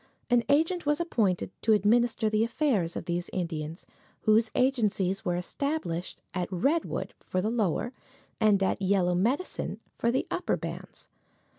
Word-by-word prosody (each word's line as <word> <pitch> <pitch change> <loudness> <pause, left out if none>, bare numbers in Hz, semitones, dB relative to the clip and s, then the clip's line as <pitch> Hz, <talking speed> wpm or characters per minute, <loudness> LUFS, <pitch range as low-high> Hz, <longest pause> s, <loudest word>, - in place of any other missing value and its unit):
An 240 -1 +5
agent 325 +3 +2
was 295 +1 +2
appointed 215 - 0
to 225 - +4
administer 225 +2 +3
the 215 +1 +2
affairs 230 - 0
of - - -4
these 175 0 -2
Indians, 165 -2 -4 0.4
whose 220 +1 +4
agencies 210 -7 +1
were 175 - 0
established 180 - -3
at 180 0 -2
Redwood 275 - 0
for 185 - -3
the 210 +4 0
lower 225 +1 0 0.5
and 210 -3 +4
at 190 - 0
Yellow 190 -2 +2
Medicine 245 - -1 0.2
for 235 - +2
the 255 - +1
upper - - 0
bands. - - -7
215 Hz, 145 wpm, -28 LUFS, 180-245 Hz, 0.5 s, An